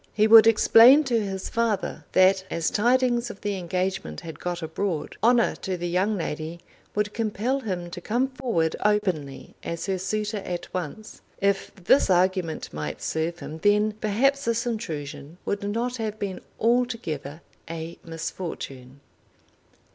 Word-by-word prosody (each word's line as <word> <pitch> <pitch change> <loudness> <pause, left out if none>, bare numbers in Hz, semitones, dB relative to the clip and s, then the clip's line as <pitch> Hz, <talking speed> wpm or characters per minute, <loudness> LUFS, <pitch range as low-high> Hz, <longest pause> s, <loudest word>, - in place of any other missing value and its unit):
He 215 - +4
would 220 0 +9
explain 230 +5 +7
to 240 -5 +1
his 195 -1 -4
father 230 -4 -1
that 190 0 +5
as 165 -1 -1
tidings 240 +1 +2
of 210 - -10
the 205 -1 -2
engagement 185 +1 -3
had 165 -2 -9
got 175 -1 -4
abroad, 160 0 -3
honour 235 +1 +4
to 190 -2 -3
the 175 0 -3
young 190 +5 +1
lady 160 0 -4 0.4
would 210 0 0
compel 230 +4 -1
him 180 -8 -4
to 175 - -7
come 245 +7 0
forward 235 - -1
openly 185 -10 -1
as 170 0 -4
her 190 -2 -1
suitor 210 +3 -2
at 180 -3 -5
once. 185 +4 -6 0.2
If 200 0 0
this 195 +7 +3
argument 180 - +1
might 75 0 -4
serve 160 +2 -1
him, 160 +1 -7
then 210 +3 +3
perhaps 230 +7 +1
this 230 +1 0
intrusion 160 -9 -5
would 200 - -1
not 230 +5 -2
have 215 -2 -3
been 200 -3 -4 0.2
altogether 225 - -1 0.3
a 165 0 -6
misfortune. 140 -5 -6
195 Hz, 145 wpm, -25 LUFS, 170-225 Hz, 0.4 s, would